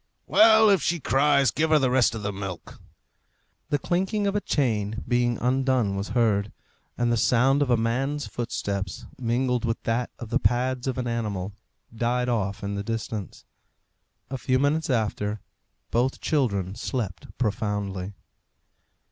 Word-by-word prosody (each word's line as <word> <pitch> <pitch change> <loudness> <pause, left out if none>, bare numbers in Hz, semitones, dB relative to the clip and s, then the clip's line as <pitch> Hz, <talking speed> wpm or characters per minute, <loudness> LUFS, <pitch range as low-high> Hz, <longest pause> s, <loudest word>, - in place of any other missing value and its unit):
"Well, 220 0 +6
if 195 -5 +3
she 170 0 0
cries, 140 -2 +3
give 155 +2 0
her 155 - +5
the 130 -3 +2
rest 125 -3 +3
of 110 - -6
the 100 0 -2
milk." 95 -2 -7 0.9
The 145 - +2
clinking 190 +7 -1
of 200 0 0
a 205 - +1
chain 110 - -1
being 120 -1 +1
undone 130 -4 +1
was 100 +1 -3
heard, 105 -3 +2 0.5
and 120 0 +1
the 120 - +2
sound 130 +5 +3
of 140 - +1
a 120 - +4
man's 135 +6 -1
footsteps, 100 -6 -4
mingled 125 +1 0
with 115 -1 -1
that 115 +2 0
of 120 - -8
the 125 +3 +1
pads 125 +1 0
of 130 - -1
an 125 - -2
animal, 105 -5 -3 0.4
died 125 +2 0
off 100 -5 -1
in 100 0 -2
the 100 0 -3
distance. 110 -2 -5 0.9
A 135 - -3
few 130 +1 +1
minutes 145 +4 +1
after, 105 -3 -1 0.5
both 125 +3 +1
children 100 - 0
slept 110 -4 -4
profoundly. 105 -4 -2
120 Hz, 155 wpm, -25 LUFS, 105-135 Hz, 0.9 s, Well